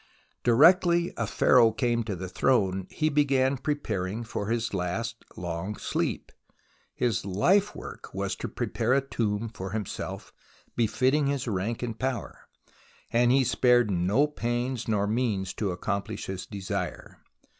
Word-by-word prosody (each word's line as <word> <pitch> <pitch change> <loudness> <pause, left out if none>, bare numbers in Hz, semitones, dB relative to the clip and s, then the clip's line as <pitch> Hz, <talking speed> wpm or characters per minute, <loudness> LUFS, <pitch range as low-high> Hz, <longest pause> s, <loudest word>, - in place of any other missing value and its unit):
Directly 170 +7 +5
a - - -2
Pharaoh 120 -3 +5
came 115 +1 0
to 105 -3 -3
the 95 +1 -5
throne, 95 -3 +1
he 155 - 0
began 140 -3 +2
preparing 115 -7 -2
for 105 -2 -4
his 115 0 -1
last 115 +6 -3
long 85 +4 -4
sleep. - - -2 0.6
His 120 -4 0
life 185 - +2
work - - -9
was - - -2
to - - -4
prepare 115 +3 -1
a 140 - +3
tomb 110 -3 -1
for 95 -4 -7
himself 105 -3 -5 0.4
befitting 130 +6 +2
his 140 -2 -1
rank 110 +3 -2
and 115 -2 -4
power, 130 -2 -4 0.6
and 120 +1 +4
he 135 +1 +4
spared 120 -2 +3
no 95 +10 +3
pains 120 -3 -2
nor 105 -2 +1
means 105 -4 -1
to 105 - -2
accomplish 100 +4 -3
his 95 -1 -5
desire. 100 -2 -5
115 Hz, 140 wpm, -27 LUFS, 100-130 Hz, 0.6 s, Directly